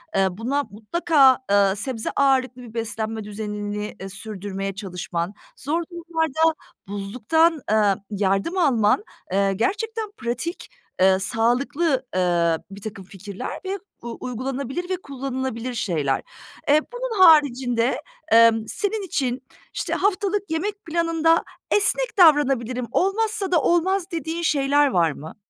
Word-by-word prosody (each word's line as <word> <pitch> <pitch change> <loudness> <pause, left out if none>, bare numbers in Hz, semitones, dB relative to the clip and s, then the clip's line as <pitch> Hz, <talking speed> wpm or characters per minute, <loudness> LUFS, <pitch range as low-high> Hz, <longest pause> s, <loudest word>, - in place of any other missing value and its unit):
eee, 195 0 +4
buna 245 +9 -1
mutlaka, 265 +4 +3
eee, 200 -1 +4
sebze 225 +1 -3
ağırlıklı 260 -2 +2
bir 235 -2 -11
beslenme 220 -1 -3
düzenini, 210 0 -5
eee, 195 - -6
sürdürmeye 195 -1 -5
çalışman, 180 -2 -4 0.2
zor 325 +5 -1
durumlarda 325 -2 0 0.3
buzluktan, 250 - +1
eee, 210 -2 +4
yardım 200 - 0
alman, 265 - +3 0.3
eee, 195 +1 +2
gerçekten 430 - -2
pratik, 245 +9 -4 0.3
eee, 190 0 +5
sağlıklı, 255 - +1
eee, 170 -2 +2
birtakım 200 0 -8
fikirler 200 +4 -7
ve 390 +1 -3 0.2
u 235 -1 -7
uygulanabilir 270 +7 -4
ve 375 - +1
kullanılabilir 260 -3 -4
şeyler. 155 - -1 0.5
Eee, 300 +2 +6
bunun 485 -5 -2
haricinde, 260 -6 +4 0.3
emm, 225 -1 +5
senin 415 - -2
için, 265 -7 -2 0.3
işte, - - -2
haftalık 400 0 0
yemek 405 +5 -3
planında 330 0 +2 0.3
esnek 450 +3 +3
davranabilirim, 265 - +4
olmazsa 405 - 0
da 335 -5 +4
olmaz 365 +2 +1
dediğin 325 +1 -3
şeyler 290 -2 +3
var 170 - +2
mı? 150 +3 -10
255 Hz, 120 wpm, -23 LUFS, 210-330 Hz, 0.5 s, Eee